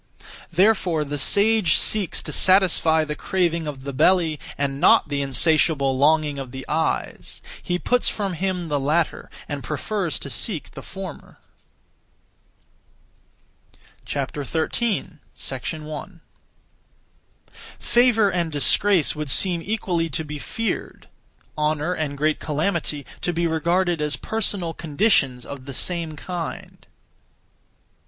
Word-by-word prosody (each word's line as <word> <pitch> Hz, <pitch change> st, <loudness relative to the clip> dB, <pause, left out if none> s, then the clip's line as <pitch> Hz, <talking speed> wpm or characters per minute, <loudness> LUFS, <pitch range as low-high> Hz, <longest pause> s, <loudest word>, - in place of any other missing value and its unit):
Therefore 180 Hz, -3 st, +2 dB
the 145 Hz, 0 st, -4 dB
sage 205 Hz, +2 st, +4 dB
seeks 210 Hz, -5 st, +1 dB
to -, -, -5 dB
satisfy 175 Hz, -4 st, +4 dB
(the 150 Hz, -, -3 dB
craving 170 Hz, -2 st, -1 dB
of) 135 Hz, -3 st, -6 dB
the 140 Hz, 0 st, -5 dB
belly, 165 Hz, +1 st, +3 dB, 0.2 s
and 140 Hz, 0 st, -2 dB
not -, -, +5 dB
the 140 Hz, -1 st, -1 dB
(insatiable 140 Hz, 0 st, +3 dB
longing 150 Hz, +1 st, +2 dB
of 135 Hz, -2 st, -6 dB
the) 130 Hz, +1 st, -8 dB
eyes. 160 Hz, +1 st, -2 dB, 0.2 s
He 175 Hz, -, -1 dB
puts 245 Hz, +6 st, +2 dB
from 200 Hz, -3 st, -3 dB
him 180 Hz, 0 st, -2 dB
the 145 Hz, -2 st, 0 dB
latter, 155 Hz, +4 st, 0 dB, 0.2 s
and 145 Hz, -2 st, -5 dB
prefers 170 Hz, +1 st, -2 dB
to 140 Hz, -, -6 dB
seek 175 Hz, -, -2 dB
the -, -, -9 dB
former. 190 Hz, -5 st, -9 dB, 2.7 s
13. 160 Hz, -, -2 dB
1. 155 Hz, +6 st, -6 dB, 1.6 s
Favour 240 Hz, -4 st, +3 dB
and 170 Hz, -3 st, -1 dB
disgrace 170 Hz, +4 st, +3 dB
would 150 Hz, -1 st, -4 dB
seem 175 Hz, +4 st, +3 dB
equally 180 Hz, -5 st, -1 dB
to 160 Hz, +2 st, -2 dB
be 150 Hz, 0 st, -6 dB
feared; 225 Hz, +9 st, -4 dB, 0.5 s
honour 150 Hz, +2 st, 0 dB
and 150 Hz, -4 st, -3 dB
great 155 Hz, +1 st, +1 dB
calamity, 155 Hz, -2 st, -2 dB, 0.2 s
to 175 Hz, -, 0 dB
be 170 Hz, 0 st, -1 dB
regarded 170 Hz, +1 st, +1 dB
as 150 Hz, -2 st, +1 dB
personal 190 Hz, 0 st, -1 dB
conditions 145 Hz, -, +1 dB
(of 135 Hz, -2 st, -8 dB
the 140 Hz, -2 st, -7 dB
same 170 Hz, -1 st, -2 dB
kind). 170 Hz, +2 st, -7 dB
160 Hz, 120 wpm, -23 LUFS, 145-185 Hz, 2.7 s, not